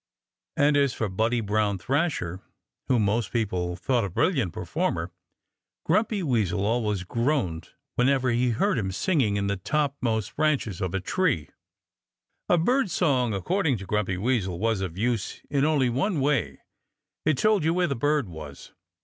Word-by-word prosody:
And 145 +1 +4
as 140 -3 +2
for 110 - -1
Buddy 115 +5 0
Brown 105 -1 0
Thrasher, 100 - -1 0.5
whom 120 -5 +3
most 105 +1 0
people 90 -6 -1
thought 120 +6 0
a 100 - -2
brilliant 130 - +1
performer, - - -2 0.7
Grumpy 210 +3 +1
Weasel 105 - 0
always 105 -4 0
groaned 115 - -1 0.3
whenever 130 0 +3
he 120 +1 +2
heard 130 - +1
him 95 -3 -2
singing 120 - +1
in 100 0 0
the 100 0 -1
topmost 130 -2 -1
branches 140 - 0
of 95 -1 -2
a - - +1
tree. 140 - 0 1.0
A 175 - +5
bird 245 +7 +2
song 130 - +1
according 155 - 0
to 95 - -8
Grumpy 95 -2 -1
Weasel 100 -5 0
was 110 0 0
of 90 -2 -4
use 115 -1 -1
in 140 0 +2
only 150 -4 +3
one 160 - 0
way: 140 -2 0 0.6
it 155 -3 +2
told 215 -1 +3
you 160 - +2
where 180 +1 +2
the 140 -4 -1
bird 145 0 +1
was. 75 -4 -10
120 Hz, 160 wpm, -26 LUFS, 100-150 Hz, 1.0 s, A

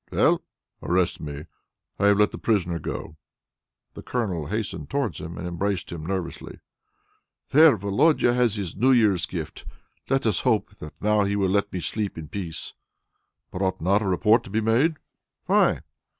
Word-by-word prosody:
"Well?" - - +3 0.4
"Arrest 90 0 +1
me! 75 0 -6 0.5
I 100 - +4
have 100 -1 +5
let 105 0 +3
the - - -7
prisoner 90 -6 0
go!" 75 - -6 0.8
The - - -9
Colonel 95 - -2
hastened 105 +3 -4
towards 135 - -2
him, 85 +2 -7
and 90 - -5
embraced 95 +2 -2
him 85 -3 -6
nervously. 95 -3 -5 0.9
"There! 155 +1 +7
Volodia 120 - +3
has 120 -3 +2
his 100 -5 -4
New 125 +6 +3
Year's 100 -7 +3
gift! 80 -4 -6 0.5
Let 135 -1 +1
us 105 -6 +2
hope 110 -5 +1
that 75 - -11
now 105 0 +2
he 100 +1 0
will 100 -2 +1
let 100 +1 +1
me 90 - -4
sleep 100 +4 -3
in 80 -2 -7
peace." 85 -6 -5 0.8
"But 90 - -5
ought 95 -1 0
not 100 +5 +2
a 105 - -2
report 105 +5 +3
to - - -10
be 105 +3 0
made?" 120 +9 +2 0.5
"Why?" - - +3
100 Hz, 170 wpm, -25 LUFS, 90-110 Hz, 0.9 s, There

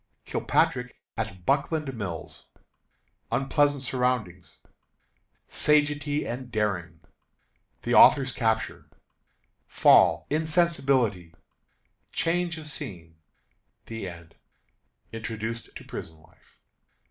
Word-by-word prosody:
Kilpatrick 125 -1 0 0.2
at 95 -5 -5
Buckland 145 - 0
Mills. 95 -8 -6 0.8
Unpleasant 145 0 +2
Surroundings. 125 -10 -2 0.9
Sagacity 145 0 +1
and 125 +1 -6
Daring. 95 -7 -2 0.8
The - - -1
Author's 135 -2 +7
Capture. 110 -2 -1 0.8
Fall, - - +5
Insensibility, 140 - +1 0.8
Change 170 0 0
of 155 - -9
Scene. 85 - -7 0.7
The 110 -4 -5
End. 85 -1 -13 0.8
Introduced 115 0 -5
to - - -9
Prison 80 - -8
Life. 80 - -25
125 Hz, 80 wpm, -27 LUFS, 95-145 Hz, 0.9 s, Author's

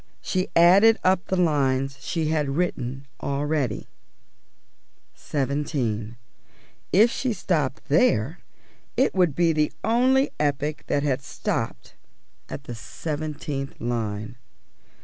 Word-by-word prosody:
She 185 -1 -1
added 195 +7 +7
up 185 0 +3
the 190 - 0
lines 135 -5 +1
she 160 -3 -2
had 150 -3 0
written 135 -6 -2 0.2
already 140 -4 -1 1.3
seventeen. 130 -6 -2 0.7
If 220 +5 +6
she 255 -3 -1
stopped 155 -10 -1
there, 160 - +2 0.6
it 265 - +3
would 180 -6 +2
be 170 -2 +3
the 150 -1 +1
only 260 +4 +3
epic 145 +1 -1
that 140 - +1
had 135 -2 0
stopped 135 - -4 0.6
at 140 - -6
the 120 - -7
seventeenth 145 +2 -5
line. 110 -1 -3
150 Hz, 110 wpm, -25 LUFS, 135-175 Hz, 1.3 s, added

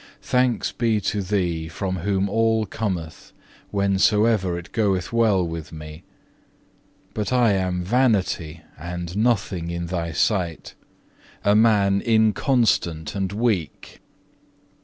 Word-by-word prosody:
4. 125 - 0
Thanks 125 -2 0
be 115 -3 0
to 105 0 -2
Thee, 90 -5 -1
from 95 +3 -3
whom 95 +2 0
all 110 +1 +1
cometh, 90 -6 -5 0.4
whensoever 100 -1 +2
it 85 - -9
goeth 100 -3 0
well 105 -6 +2
with 80 -2 -6
me! 75 0 -9 1.1
But 105 -2 -3
I 120 -3 +4
am 90 -2 -1
vanity 95 -8 0 0.2
and 85 +2 -6
nothing 105 -6 0
in 85 0 -3
Thy 85 -1 -3
sight, 85 0 -1 0.7
a 100 - +4
man 100 -3 +3
inconstant 110 - +1
and 95 -2 -2
weak. 105 -6 -2
100 Hz, 115 wpm, -23 LUFS, 85-110 Hz, 1.1 s, I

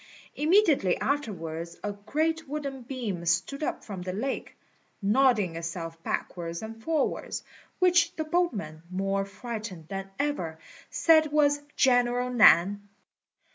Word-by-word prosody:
Immediately 305 - +3
afterwards 170 - -3
a 205 - -1
great 305 +10 -2
wooden 280 -3 -4
beam 235 -8 -4
stood 175 - 0
up 305 - -2
from 195 -4 -7
the 180 0 -4
lake, 260 +8 -4 0.4
nodding 210 -4 +3
itself 165 0 -5
backwards 170 +2 -4
and 225 +1 -8
forwards, 315 +1 -1 0.3
which 355 -2 +3
the 315 - -2
boatmen, 245 - -1
more 195 +1 -1
frightened 200 -5 -7
than 195 0 -5
ever, 230 - -2 0.3
said 315 -2 +4
was 290 -1 +3
General 245 -1 +3
Nan. 205 -3 +5
225 Hz, 120 wpm, -28 LUFS, 185-290 Hz, 0.4 s, Nan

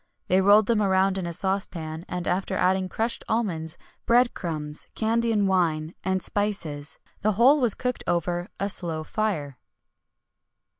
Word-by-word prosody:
They 185 +1 +4
rolled 205 +2 +6
them 225 -1 +2
round 190 -1 +2
in 175 - -3
a - - -3
saucepan, 170 -3 -3
and 180 -1 -4
after 190 +1 -1
adding 185 0 +1
crushed 230 +4 -2
almonds, 170 -9 -1 0.3
bread 240 +1 +4
crumbs, 155 -4 -5
Candian 225 -1 +1
wine, 165 -4 +1
and 190 -1 0
spices, 165 -8 -2 0.2
the 215 +1 +2
whole 265 +8 +5
was 235 -5 +2
cooked 250 -1 -3
over 175 +1 -1
a 200 - 0
slow 165 -5 0
fire. 155 - -2
190 Hz, 145 wpm, -25 LUFS, 170-215 Hz, 0.3 s, rolled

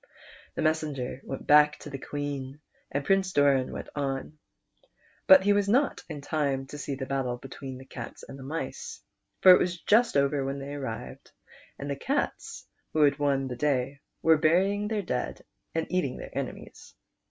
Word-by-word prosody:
The - - -1
messenger 150 -5 -1
went 135 - -6
back 150 0 +6
to 150 - -8
the 135 - -5
Queen, 145 -1 -5 0.3
and 140 +1 -2
Prince 195 -1 +2
Doran 140 -3 +3
went - - -6
on; 140 +1 -3 0.9
but 190 -1 +9
he 205 +1 +4
was 200 0 +1
not 265 +6 +2
in 150 -3 -6
time 140 -2 -1
to 145 - -6
see 140 -1 -3
the 130 0 -5
battle 130 -3 -1
between 130 0 -8
the 130 - -12
cats 120 -3 -8
and 135 - -10
mice, 135 +1 -5 0.4
for 185 - +10
it 180 - +8
was 175 -1 -1
just 225 -4 +3
over 140 0 +2
when 135 +1 -3
they 140 +1 -6
arrived, 115 - -6 0.5
and 140 - -6
the 140 - -2
cats, 275 - -3 0.3
who 155 - +4
had 140 0 +3
won 140 -2 +1
the 125 - -4
day, 135 0 0 0.2
were 160 -1 +6
bur\ 165 +4 +5
ing 205 +1 -1
their 210 -2 -1
dead 125 -8 -3 0.3
and 165 - 0
eating 180 -8 0
their - - -9
enemies. - - -6
145 Hz, 180 wpm, -28 LUFS, 135-165 Hz, 0.9 s, for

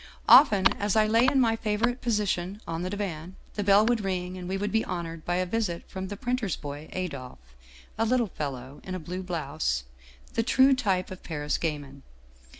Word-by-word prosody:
" - - -26
Often, 205 -10 +7
as 205 -1 0
I 215 -1 +5
lay 230 +3 +4
in 270 +1 +3
my 230 -3 +3
favorite 225 +3 -1
position 205 -4 -1
on 165 0 -3
the 180 - -2
divan, 185 -3 -4 0.2
the 205 - -2
bell 200 +2 +5
would 235 -2 +1
ring 185 -1 -2
and 180 -1 -7
we 190 - -1
would 205 +1 -2
be 225 0 +2
honored 165 -2 -5
by 175 - 0
a 185 +1 +1
visit 185 -3 -2
from 190 0 -5
the 205 +1 -6
printer's 245 -5 -1
boy 145 +1 -8
Adolphe, 130 - -6 0.4
a 225 - +3
little 245 +1 +2
fellow 135 -1 -5
in 185 - -5
a - - -4
blue 180 +3 -5
blouse, 155 - -2 0.5
the - - +1
true 260 +3 +5
type 195 -9 0
of 185 - -8
Paris 150 -3 -2
gamin. 145 -4 -4
185 Hz, 200 wpm, -27 LUFS, 165-215 Hz, 0.5 s, Often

